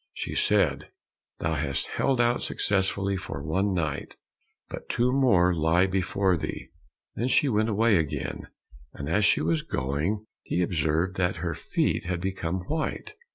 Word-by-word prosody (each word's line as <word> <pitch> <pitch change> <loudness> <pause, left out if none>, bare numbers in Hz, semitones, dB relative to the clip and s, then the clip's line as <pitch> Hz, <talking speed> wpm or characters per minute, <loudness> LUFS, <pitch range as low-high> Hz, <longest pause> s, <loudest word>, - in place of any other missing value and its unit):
She - - -5
said, - - +2 0.5
"Thou 80 - -1
hast 70 -2 -1
held 135 -2 0
out 120 0 +2
successfully 100 0 0
for 70 -7 -6
one 95 +6 0
night, 80 -6 -2 0.5
but - - -8
two 125 +1 +2
more 95 -10 +4
lie 85 +3 +3
before 95 0 +1
thee." 75 0 -5 0.5
Then 120 - -1
she 140 - +3
went 110 -2 +1
away 110 -1 +3
again, 75 -3 -3 0.5
and 70 - -6
as 105 +6 +2
she - - +4
was 80 0 +1
going, 75 +12 -2 0.2
he 90 - -1
observed 85 +2 0
that 90 -1 +1
her 85 - -1
feet - - -1
had 90 -1 -2
become 95 -1 -2
white. 155 - -3
90 Hz, 155 wpm, -27 LUFS, 80-105 Hz, 0.5 s, more